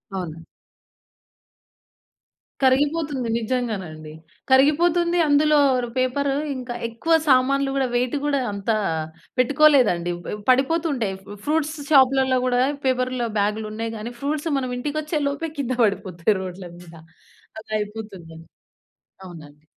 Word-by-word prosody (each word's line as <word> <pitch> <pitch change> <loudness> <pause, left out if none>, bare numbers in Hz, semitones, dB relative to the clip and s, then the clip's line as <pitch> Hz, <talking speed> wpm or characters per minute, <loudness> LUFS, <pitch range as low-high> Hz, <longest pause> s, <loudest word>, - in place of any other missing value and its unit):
అవును. 165 -3 -5 2.2
కరిగిపోతుంది. 285 0 +1
నిజ్జంగానండి. 210 -10 -4 0.4
కరిగిపోతుంది. 340 +6 +3
అందులో 300 +1 +4 0.3
ర్ 235 - -8
పేపర్ 255 +2 0 0.3
ఇంకా 250 -1 -6
ఎక్కువ 230 +9 -1
సామాన్లు 275 +1 +3
కూడా 270 -2 +1
వెయిటు 250 +3 0
గూడా 285 -1 +1
అంతా 200 +3 -1 0.6
పెట్టుకోలేదండి. 255 - +4
ప - - -8 0.2
పడిపోతుంటాయి. 270 - +1 0.3
ఫ్రూట్స్ 310 0 0 0.2
షాప్‌లలో 265 -1 +4
గూడా 245 0 +2 0.2
పేపర్ల 255 -1 0
బ్యాగ్‌లు 210 +2 0
ఉన్నాయి 225 +1 -4
కానీ, 225 +3 -6
ఫ్రూట్స్ 300 +3 -2
మనం 255 -1 -4
ఇంటికి 290 +4 -3
వచ్చేలోపే 300 0 -2
కింద 255 -3 -2
పడిపోతాయి 195 -1 -1
రోడ్ల 185 0 -7
మీద. 175 -1 -14 0.7
అలా 220 - -15
అయిపోతుందండి. 195 -6 -8 0.8
అవునండి. 150 -4 -13
255 Hz, 105 wpm, -22 LUFS, 210-285 Hz, 2.2 s, అందులో